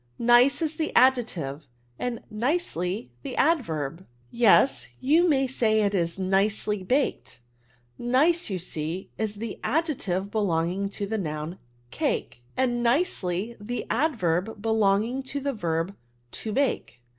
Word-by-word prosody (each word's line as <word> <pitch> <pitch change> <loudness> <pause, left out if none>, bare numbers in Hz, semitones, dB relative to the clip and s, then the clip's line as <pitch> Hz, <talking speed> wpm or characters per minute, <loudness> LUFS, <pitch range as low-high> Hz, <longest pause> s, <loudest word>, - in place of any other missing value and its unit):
Nice 245 +6 +5
is 315 0 -2
the 315 - -1
adjective, 205 - +2 0.3
and 245 -2 -3
nicefy 215 - -1
the - - -6
adverb. 170 - 0
'' 120 - -35
Yes; 235 +3 +4
you 320 +7 +4
may 270 -3 +3
say 225 -4 +2
it 200 0 +1
is 170 -2 0
nicely 195 +1 +1
baked^. 265 +9 -1 0.6
Nice^ 295 +8 +2
you 190 - -2
see, 165 +1 -4
is 215 -1 -1
the 220 +1 -6
adjective 220 - -1
beloi^B^g 190 -1 0
ta 200 - -2
the 220 +2 -2
noun 155 0 -4 0.3
cake, 120 - -2 0.2
and 240 -2 +1
nieehf 235 - 0
tiie 235 +4 -5
adverb 220 - 0
belong* 210 -2 +2
ing 250 +4 -3
to 270 +2 -4
the 280 0 -2
verb 170 -2 -2 0.4
to 220 - -4
hake. 235 - -1
215 Hz, 135 wpm, -26 LUFS, 185-260 Hz, 0.6 s, Nice